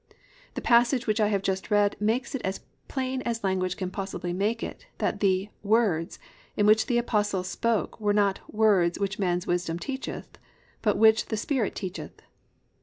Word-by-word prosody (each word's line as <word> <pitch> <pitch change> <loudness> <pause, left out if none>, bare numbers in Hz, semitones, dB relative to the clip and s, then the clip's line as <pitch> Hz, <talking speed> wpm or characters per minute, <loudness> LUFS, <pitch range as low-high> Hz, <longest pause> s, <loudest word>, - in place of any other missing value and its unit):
The - - -4
passage 240 +1 +4
which 215 0 0
I 210 - +4
have 200 -2 0
just 190 -1 -2
read 205 -1 +3
makes 230 +7 0
it 270 - -3
as 190 +1 -3 0.3
plain 260 -1 -2
as 230 -2 -3
language 185 -1 0
can 185 -1 -3
possibly 190 -2 -4
make 210 +5 -1
it - - -7
that 205 - -1
the 195 0 +1
"words" 205 -6 +1 0.4
in 205 - +3
which 215 +1 +5
the 245 - +2
Apostle 210 -5 0
spoke 225 +5 -1
were 205 -1 +2
not 200 -1 +2
"words 200 -6 +3
which 200 +1 -2
man's 180 -2 0
wisdom 175 -2 -1
teacheth, 265 +8 -6 0.4
but 210 -4 +1
which 220 0 +5
the 220 - -2
Spirit 235 0 -1
teacheth." 190 -1 -7
205 Hz, 175 wpm, -27 LUFS, 190-230 Hz, 0.4 s, which